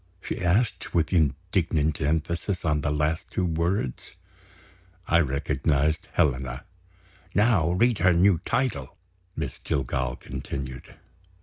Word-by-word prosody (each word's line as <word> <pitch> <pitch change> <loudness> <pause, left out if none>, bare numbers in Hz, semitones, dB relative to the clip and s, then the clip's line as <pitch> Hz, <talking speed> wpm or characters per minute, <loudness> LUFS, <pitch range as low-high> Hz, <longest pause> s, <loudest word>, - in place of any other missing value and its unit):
she - - -5
asked, 95 +6 0
with 85 +1 +1
indignant 80 0 +1
emphasis 85 +5 -1
on 75 -2 +1
the 75 - 0
last 75 +3 -1
two 90 - -1
words. 85 -4 -2 0.9
I 85 - +4
recognized 75 +1 0
Helena. 65 -1 0 0.7
"Now 100 -6 +3
read 115 +3 +2
her 90 - +5
new 90 0 +4
title," 70 - -1 0.4
Miss - - -4
Jillgall 60 -2 -1
continued. 65 -1 -6
80 Hz, 110 wpm, -26 LUFS, 70-90 Hz, 0.9 s, her